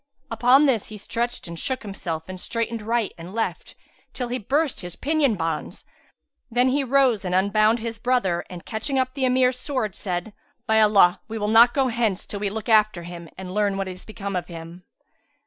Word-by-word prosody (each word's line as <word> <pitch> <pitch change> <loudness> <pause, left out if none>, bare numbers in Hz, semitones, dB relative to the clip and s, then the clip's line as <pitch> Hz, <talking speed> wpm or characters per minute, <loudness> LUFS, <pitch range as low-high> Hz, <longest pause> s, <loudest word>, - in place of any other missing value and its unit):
Upon 260 +4 +5
this 245 -7 +1
he 215 - -8
stretched 235 +2 -3
and 170 -1 -7
shook 260 +5 -2
himself 170 -6 -5
and 185 0 -7
strained 230 -1 -2
right 230 0 -1
and 175 +5 -9
left, 185 -7 -3 0.4
till 250 -2 -4
he 250 +1 -2
burst 280 +6 0
his 175 -1 -7
pinion 290 -5 +1
bonds; 165 -3 -4 0.6
then 245 +2 +3
he 280 +2 +1
rose 260 -5 +3
and 180 -1 -1
unbound 215 +4 +3
his 225 -1 -5
brother 205 -8 +1
and 180 -2 -9
catching 235 +5 -2
up 255 0 0
the 270 -2 0
Emir's 255 0 +2
sword, 255 -9 -2
said, 180 +2 -3 0.3
"By 220 -2 +4
Allah, 200 -4 +5
we 225 - -5
will 210 -1 -1
not 235 +2 +6
go 270 -2 +2
hence, 225 -5 0
till 205 - -5
we 205 0 -1
look 215 +1 -6
after 215 -5 +3
him 170 -1 -9
and 185 -1 -7
learn 205 -1 +1
what 195 -1 -2
is 185 -1 -8
become 200 -2 -6
of 180 - -2
him." 170 +1 -10
215 Hz, 200 wpm, -24 LUFS, 185-245 Hz, 0.6 s, not